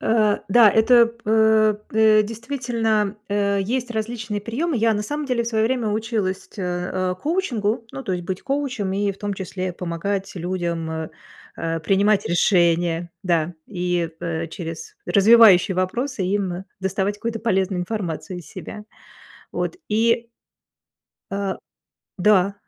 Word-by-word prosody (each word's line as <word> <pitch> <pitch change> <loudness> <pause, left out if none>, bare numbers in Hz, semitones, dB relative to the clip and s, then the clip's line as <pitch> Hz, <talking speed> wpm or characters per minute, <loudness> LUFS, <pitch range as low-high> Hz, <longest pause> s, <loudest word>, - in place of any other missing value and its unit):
Э, 215 -2 +2
да, 220 +1 +7
это 235 +3 +5
п 235 0 -13
э. 220 0 +4 0.2
Э, 220 -1 +5
действительно, 225 -2 -1
э, 200 -1 +1
есть 245 +4 -2
различные 220 -2 -3
приемы. 265 +9 -2
Я 225 0 +3
на 210 - -1
самом 295 +7 -4
деле 245 -3 0
в - - -8
свое 220 -2 +1
время 240 -1 0
училась 210 -3 -2
те 200 - -8 0.3
э, 185 -1 -1
коучингу, 240 - -1
ну, 270 - -6
то 190 - -2
есть 175 -1 -3
быть 185 +1 -4
коучем 270 -8 -2
и, 200 +1 0
в 195 - -17
том 205 -1 -3
числе, 185 -1 -4
помогать 180 +3 -3
людям, 170 -2 -3
э 160 -1 -4 0.5
э 165 0 -2
принимать 200 +4 +2
решения, 170 -1 +2
да, 170 -2 0
и, 180 -3 -1
э, 165 0 -3
через 170 - -7
развивающие 200 -3 +6
вопросы 235 +6 -1
им 190 -1 -1 0.2
доставать 190 +1 -1
какую-то 230 +1 -3
полезную 190 -4 0
информацию 180 -2 -4
из 170 - -11
себя. 210 +7 -8 0.7
Вот. - - -2
И 230 +2 +1 1.0
А. 195 -1 -2 0.6
Да, 195 0 +3
205 Hz, 145 wpm, -22 LUFS, 185-225 Hz, 1.0 s, да